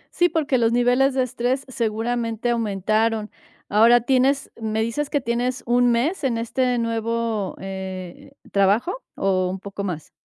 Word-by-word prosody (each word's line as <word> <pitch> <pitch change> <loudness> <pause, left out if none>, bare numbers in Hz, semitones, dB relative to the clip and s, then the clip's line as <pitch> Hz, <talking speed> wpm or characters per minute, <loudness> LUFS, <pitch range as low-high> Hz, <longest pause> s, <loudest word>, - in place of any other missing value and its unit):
Sí, 350 0 +4
porque 300 -6 +1
los 230 -1 +3
niveles 245 +3 +3
de 260 - +3
estrés 255 +2 -2
seguramente 235 -1 -1
aumentaron, 215 0 0 0.4
ahora 230 +4 +5
tienes 265 +3 +1
¿me 220 0 -1
dices 275 +6 -2
que 290 - 0
tienes 245 +2 -1
un 245 0 +3
mes 290 +10 0
en 250 -4 +1
este 250 +2 0
nuevo, 230 -3 -1
eh, 190 +4 -7 0.2
trabajo 210 - +1
o 185 -2 +1
un 190 +1 -4
poco 200 +1 -6
más? 175 -6 -5
230 Hz, 145 wpm, -23 LUFS, 215-255 Hz, 0.4 s, ahora